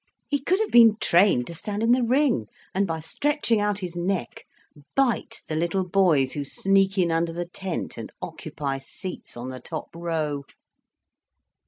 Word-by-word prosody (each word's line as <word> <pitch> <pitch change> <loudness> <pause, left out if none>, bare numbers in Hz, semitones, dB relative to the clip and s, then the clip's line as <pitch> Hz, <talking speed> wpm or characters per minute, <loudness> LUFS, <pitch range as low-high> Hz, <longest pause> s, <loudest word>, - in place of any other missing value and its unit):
He 285 - 0
could 360 +8 +1
have 440 - 0
been 230 -3 +8
trained 175 -8 +4
to 170 - -8
stand 205 +5 -3
in 230 - +4
the 250 +1 +4
ring, 245 - +2 0.3
and 195 +1 +1
by 160 -1 -3
stretching 280 - 0
out 205 -1 +1
his 180 -2 -5
neck 180 +1 -2 0.5
bite 265 -5 0
the 155 - -3
little 170 +3 0
boys 170 -9 +3
who 145 - -2
sneak 195 +6 +2
in 175 -3 +3
under 165 +1 +1
the 175 +1 -3
tent 185 -1 -5
and - - -7
occupy 135 -2 -4
seats 180 +2 -8
on 120 +2 -5
the 130 0 -7
top 160 +3 -6
row." 160 -4 -2
180 Hz, 170 wpm, -25 LUFS, 160-210 Hz, 0.5 s, been